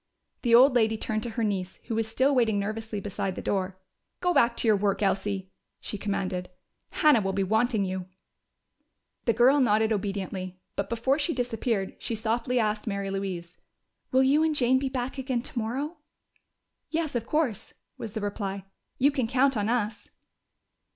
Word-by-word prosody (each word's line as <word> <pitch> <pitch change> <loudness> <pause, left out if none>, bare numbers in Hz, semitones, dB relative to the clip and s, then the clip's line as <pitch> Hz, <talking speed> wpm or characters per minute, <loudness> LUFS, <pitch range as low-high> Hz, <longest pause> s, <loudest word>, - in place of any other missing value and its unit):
The 235 -2 +5
old 255 +3 +7
lady 220 -2 +3
turned 215 0 -2
to 235 - -4
her 230 0 -2
niece, 190 -3 -2
who 235 - -4
was 225 0 0
still 260 +5 +2
waiting 230 -5 +3
nervously 215 +1 -3
beside 195 -1 -3
the - - -5
door. 190 -1 -1 0.4
"Go 360 0 +1
back 235 -5 +3
to - - 0
your 215 - +6
work, 200 +1 0
Elsie," 195 -1 -1 0.3
she - - -5
commanded. 185 -3 -2 0.4
"Hannah 300 -8 +4
will 195 -1 -1
be 195 0 +1
wanting 220 +1 +2
you." 185 -1 -4 1.2
The 230 - +3
girl 250 +6 +5
nodded 220 -3 +3
obediently, 190 -2 -4 0.2
but 200 - -2
before 240 +5 +1
she 320 +1 0
disappeared 230 -4 -1
she 230 - -3
softly 230 +3 0
asked 215 -1 0
Mary 200 -1 -2
Louise, 180 -3 -4 0.5
"Will 260 +1 +5
you 280 +4 +4
and 320 -1 +2
Jane 260 -1 +4
be 270 0 -1
back 260 +1 -3
again 255 -3 -1
tomorrow?" 265 +8 -3 0.9
"Yes, 320 -2 -1
of 230 0 -2
course," 255 -9 -1 0.2
was 215 - -6
the 220 - -3
reply. 200 -1 -3 0.3
"You 280 +3 +4
can 260 -5 -1
count 265 +2 +3
on 210 0 0
us." 225 -3 -1
220 Hz, 170 wpm, -27 LUFS, 200-250 Hz, 1.2 s, old